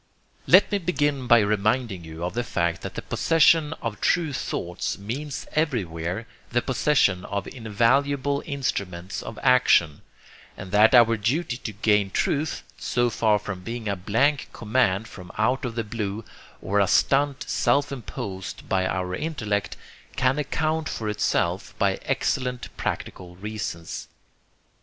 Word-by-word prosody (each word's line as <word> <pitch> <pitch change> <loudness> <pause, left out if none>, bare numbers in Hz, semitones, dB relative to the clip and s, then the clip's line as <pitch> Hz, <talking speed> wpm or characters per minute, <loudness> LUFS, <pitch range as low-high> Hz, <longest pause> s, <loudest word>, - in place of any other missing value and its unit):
Let - - +6
me 205 - +1
begin 145 -7 0
by 120 -1 +7
reminding 105 -1 0
you 80 +1 -8
of 90 - -2
the 120 - -1
fact 85 -8 -1
that - - -7
the - - -5
possession 160 -1 +3
of 115 -2 -4
true 165 -5 +2
thoughts 90 -8 -3
means 130 +8 -5
everywhere 95 - -1 0.2
the 120 0 +1
possession 125 -8 +2
of 100 -1 -3
invaluable 135 +5 +1
instruments 100 - -3
of 115 - -8
action; 85 - +4 0.6
and 95 -1 -8
that 110 +4 +6
our 115 -1 +6
duty 120 +5 -1
to 115 - -6
gain 105 -1 +2
truth, 145 +9 -1 0.2
so 120 -1 +1
far 110 -1 +3
from 100 -2 -6
being 115 +2 -5
a 100 - 0
blank 125 +10 +1
command 110 -2 +1
from 90 -3 -11
out 125 +5 +1
of 120 -2 -4
the 115 - -1
blue, 105 0 -4 0.4
or 100 +2 +1
a 100 - +4
'stunt' 140 +4 +2
self 140 0 +2
imposed 100 -7 -6
by 95 -1 +1
our 90 -1 -2
intellect, 105 - -2 0.4
can 130 +3 +2
account 155 +2 -1
for 110 -2 -3
itself 105 0 -1
by - - +2
excellent 125 -1 -1
practical 90 -1 -5
reasons. 95 -4 -5
115 Hz, 145 wpm, -25 LUFS, 100-135 Hz, 0.6 s, by